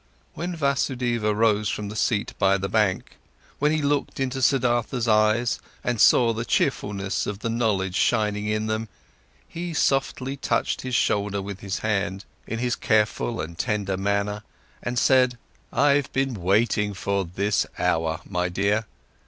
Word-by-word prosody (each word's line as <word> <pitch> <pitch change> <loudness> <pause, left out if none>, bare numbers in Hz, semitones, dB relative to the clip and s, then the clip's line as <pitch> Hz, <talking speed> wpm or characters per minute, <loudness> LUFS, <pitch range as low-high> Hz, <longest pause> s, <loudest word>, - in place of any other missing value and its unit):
When 175 +1 -4
Vasudeva 125 -7 0
rose 105 -1 +2
from 105 -1 -3
the 105 - -7
seat 110 -1 0
by 100 0 +4
the 95 0 -3
bank, 100 -2 0 0.4
when 150 +1 +3
he 155 -1 0
looked 145 -1 0
into 130 0 -1
Siddhartha's 120 -2 +1
eyes 110 +2 +3 0.2
and 120 -3 0
saw 115 -2 +6
the 115 +1 -3
cheerfulness 105 -7 -1
of 105 - -3
the 115 - -2
knowledge 100 -5 0
shining 105 -1 +1
in 110 0 0
them, 110 0 -2 0.6
he 170 0 -5
softly 135 -1 0
touched - - -1
his 130 -1 -3
shoulder 100 -2 +1
with 100 0 -6
his 100 0 -3
hand, 100 -2 -1 0.2
in 115 - -3
this 125 -1 0
careful 110 +1 +1
and 85 +2 -6
tender 105 -4 -1
manner, 100 +1 -1 0.4
and 120 +1 -3
said: 125 -1 +4 0.3
"I've 140 +1 +2
been 135 -1 0
waiting 105 +1 +1
for 100 0 -1
this 95 +3 0
hour, 80 0 0
my 90 -2 -1
dear. 100 +4 0
110 Hz, 155 wpm, -24 LUFS, 100-125 Hz, 0.6 s, saw